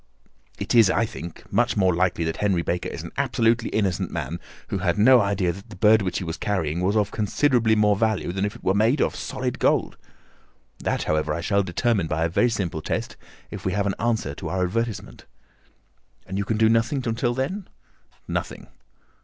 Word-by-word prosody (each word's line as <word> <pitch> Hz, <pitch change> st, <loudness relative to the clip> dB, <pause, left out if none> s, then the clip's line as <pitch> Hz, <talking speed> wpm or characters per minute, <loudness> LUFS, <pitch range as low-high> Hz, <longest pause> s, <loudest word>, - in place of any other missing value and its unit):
"It -, -, -3 dB
is, 115 Hz, -5 st, +6 dB
I 115 Hz, -, +2 dB
think, 85 Hz, -5 st, -8 dB
much 120 Hz, +2 st, +2 dB
more 95 Hz, -2 st, +3 dB
likely 85 Hz, -1 st, +1 dB
that 80 Hz, 0 st, -2 dB
Henry 95 Hz, -5 st, +1 dB
Baker 90 Hz, +1 st, -2 dB
is -, -, -7 dB
an -, -, -8 dB
absolutely 115 Hz, 0 st, +1 dB
innocent 95 Hz, -3 st, 0 dB
man, 85 Hz, 0 st, -4 dB, 0.3 s
who 100 Hz, -, -2 dB
had 90 Hz, +1 st, 0 dB
no 125 Hz, +4 st, +7 dB
idea 100 Hz, -3 st, +1 dB
that 100 Hz, +3 st, -12 dB
the -, -, -10 dB
bird 110 Hz, +3 st, +5 dB
which 95 Hz, -2 st, -2 dB
he -, -, -3 dB
was 80 Hz, -1 st, -4 dB
carrying 85 Hz, -5 st, -1 dB
was 100 Hz, +4 st, +1 dB
of 105 Hz, -1 st, +1 dB
considerably 115 Hz, +1 st, +2 dB
more 105 Hz, -1 st, +3 dB
value 105 Hz, -6 st, 0 dB
than 95 Hz, +2 st, -2 dB
if 105 Hz, -, -2 dB
it -, -, -14 dB
were 95 Hz, -, +2 dB
made 110 Hz, +8 st, +2 dB
of -, -, +1 dB
solid -, -, -4 dB
gold. -, -, +1 dB, 0.8 s
That, -, -, -1 dB
however, 75 Hz, 0 st, 0 dB
I 85 Hz, -, -3 dB
shall 100 Hz, +3 st, +2 dB
determine 100 Hz, +1 st, 0 dB
by 80 Hz, +1 st, 0 dB
a -, -, 0 dB
very 120 Hz, +8 st, +2 dB
simple 95 Hz, -8 st, -2 dB
test -, -, -3 dB, 0.4 s
if -, -, -7 dB
we 95 Hz, -, -1 dB
have 100 Hz, 0 st, 0 dB
an 100 Hz, -, 0 dB
answer 110 Hz, -10 st, 0 dB
to -, -, -6 dB
our 95 Hz, 0 st, 0 dB
advertisement." 115 Hz, +3 st, -3 dB, 1.0 s
"And 95 Hz, -, -6 dB
you 100 Hz, -, -1 dB
can 110 Hz, -, -1 dB
do 110 Hz, 0 st, +4 dB
nothing 115 Hz, +4 st, +1 dB
until 120 Hz, +1 st, 0 dB
then?" 175 Hz, +10 st, -3 dB, 0.6 s
"Nothing." -, -, -4 dB
100 Hz, 205 wpm, -24 LUFS, 90-115 Hz, 1.0 s, no